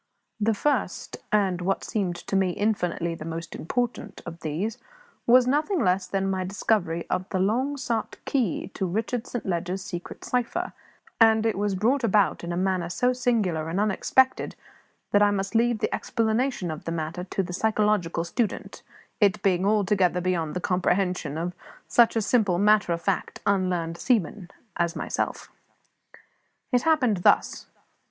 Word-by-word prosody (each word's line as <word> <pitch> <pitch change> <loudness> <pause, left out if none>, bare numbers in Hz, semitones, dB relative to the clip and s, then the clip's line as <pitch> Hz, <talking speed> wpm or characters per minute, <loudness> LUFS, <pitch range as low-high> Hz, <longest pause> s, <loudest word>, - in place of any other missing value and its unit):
The 220 +1 +2
first 290 +7 -1
and 195 -4 +2
what 195 +2 -1
seemed 190 -5 -1
to 195 - -5
me 190 -1 +3
infinitely 180 -5 -1
the 165 - -7
most 165 +1 -6
important 245 +8 -3
of 170 -1 -8
these 170 +9 -3 0.5
was 250 +1 +7
nothing 305 +8 +1
less 185 -4 +1
than 195 0 -1
my 190 -1 -1
discovery 180 -3 0
of 185 +1 -1
the 190 - -1
long 245 +10 +1
sought 235 -4 -2
key 235 - -1
to 190 - -2
Richard 225 +6 -2
Saint 245 - -5
Leger's 180 +1 -2
secret 180 -4 -7
cipher; 250 -2 -1 0.5
and 220 -1 +5
it 225 - +1
was 205 0 0
brought 240 +8 +1
about 210 -5 +2
in 170 - -4
a 175 - -2
manner 185 -2 0
so 250 +8 +1
singular 210 -11 0
and 175 +4 -1
unexpected 255 +5 +2 0.6
that 205 - +4
I 205 - +6
must 195 -1 -2
leave 235 0 +3
the - - 0
explanation 225 -4 0
of 155 - -7
the 165 - -2
matter 165 +2 -3
to 195 +1 -2
the 180 - -6
psychological 210 -4 +1
student, 215 +5 -3 0.4
it 205 -4 +3
being 190 -1 +2
altogether 200 -4 +2
beyond 175 -3 -1
the 180 - -2
comprehension 180 -4 0
of 175 +2 -3 0.3
such 235 -1 +4
a 225 - +1
simple, 205 -6 +2
matter 205 -1 +4
of 170 0 -2
fact, 195 +1 -1
unlearned 180 -4 0
seaman 205 -6 0 0.3
as 170 -1 0
myself. - - -3 1.2
It 245 -2 +3
happened 260 -10 +3
thus. 175 - +2
195 Hz, 160 wpm, -26 LUFS, 175-225 Hz, 1.2 s, was